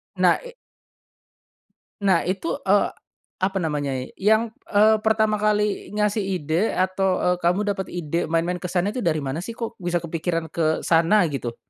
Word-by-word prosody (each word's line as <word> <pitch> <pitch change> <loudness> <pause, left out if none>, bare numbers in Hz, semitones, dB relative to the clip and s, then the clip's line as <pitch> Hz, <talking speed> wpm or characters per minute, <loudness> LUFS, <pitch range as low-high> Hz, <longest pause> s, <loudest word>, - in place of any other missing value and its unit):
Nah, - - +4
i - - -10 1.5
Nah, 190 -4 +4
itu, 195 - -2
eee, 200 -3 +3 0.5
apa 190 +1 0
namanya, 145 -6 -2
yang, 220 +3 +2 0.2
eee, 215 +1 +5
pertama 220 -1 +2
kali 210 -1 0
ngasih 210 0 +1
ide 180 +1 -1
atau, 185 0 +1
eee, 180 0 +1
kamu 180 +4 +2
dapat 190 -1 -5
ide 170 -1 -2
main-main 170 +2 0
ke 180 - -4
sana 190 +3 0
itu 255 - -3
dari 165 -6 +1
mana 140 +4 -3
sih, 230 +6 -6
kok 230 -1 -4
bisa 175 0 0
kepikiran 165 0 -2
ke 160 -1 +1
sana, 170 +4 +4
gitu? 120 -4 -4
185 Hz, 160 wpm, -23 LUFS, 165-210 Hz, 1.5 s, eee